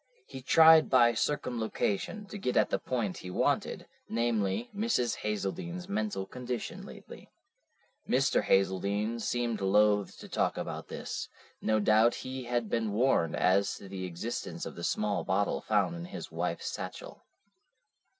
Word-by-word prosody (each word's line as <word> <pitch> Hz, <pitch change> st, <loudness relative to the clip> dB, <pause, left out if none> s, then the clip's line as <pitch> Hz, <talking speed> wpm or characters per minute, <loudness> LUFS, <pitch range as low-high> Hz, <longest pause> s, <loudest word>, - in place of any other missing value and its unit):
He 130 Hz, -, -9 dB
tried 160 Hz, +3 st, +7 dB
by 120 Hz, -2 st, +5 dB
circumlocution 120 Hz, -, -1 dB
to 205 Hz, +1 st, -8 dB
get 125 Hz, -9 st, -1 dB
at -, -, +3 dB
the -, -, +1 dB
point 115 Hz, -7 st, -2 dB
he 90 Hz, -, -8 dB
wanted, 90 Hz, -, 0 dB, 0.2 s
namely, 110 Hz, -2 st, 0 dB
Mrs. 205 Hz, -, 0 dB
Hazeldene's 170 Hz, -, -3 dB
mental 205 Hz, -, -2 dB
condition 125 Hz, 0 st, -5 dB
lately. -, -, -12 dB, 0.8 s
Mr. -, -, +3 dB
Hazeldene 100 Hz, +4 st, +1 dB
seemed 120 Hz, -1 st, -1 dB
loath 105 Hz, 0 st, +3 dB
to -, -, -10 dB
talk -, -, 0 dB
about -, -, -5 dB
this. -, -, -5 dB, 0.3 s
No 110 Hz, 0 st, +2 dB
doubt 110 Hz, +3 st, +4 dB
he 130 Hz, -1 st, -5 dB
had 120 Hz, -1 st, -1 dB
been 110 Hz, -1 st, -1 dB
warned 105 Hz, -8 st, +2 dB
as 95 Hz, +2 st, +2 dB
to 100 Hz, -, -11 dB
the 95 Hz, -1 st, -5 dB
existence 90 Hz, +7 st, -5 dB
of -, -, -6 dB
the 85 Hz, -, -9 dB
small 105 Hz, +3 st, 0 dB
bottle 100 Hz, +1 st, 0 dB
found 105 Hz, +9 st, +1 dB
in 170 Hz, 0 st, -6 dB
his 180 Hz, -, -8 dB
wife's -, -, -2 dB
satchel. -, -, -7 dB
115 Hz, 145 wpm, -30 LUFS, 100-130 Hz, 0.8 s, tried